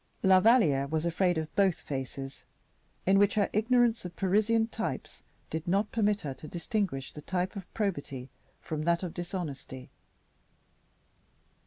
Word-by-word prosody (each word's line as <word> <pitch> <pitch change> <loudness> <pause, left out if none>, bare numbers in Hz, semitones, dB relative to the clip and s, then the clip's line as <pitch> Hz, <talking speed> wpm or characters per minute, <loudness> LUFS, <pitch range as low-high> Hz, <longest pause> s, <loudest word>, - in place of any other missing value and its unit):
La 190 -1 +7
Valliere 185 - +4
was 160 +2 -1
afraid 175 +1 +2
of 155 -1 -4
both 195 -4 +3
faces, 135 0 -6 0.6
in 195 +1 +5
which 205 0 +4
her 205 -2 +2
ignorance 235 +1 +3
of 180 -2 -7
Parisian 215 +4 +2
types 230 - -5 0.3
did 160 +2 -4
not 200 +4 +1
permit 210 -2 +1
her 140 -3 -4
to 155 - -11
distinguish 175 - -2
the 150 - -8
type 185 +4 -2
of 190 -3 -8
probity 145 - -3 0.3
from 155 -1 -4
that 170 +3 +1
of 175 - -4
dishonesty. 165 -7 -6
180 Hz, 145 wpm, -30 LUFS, 155-205 Hz, 0.6 s, La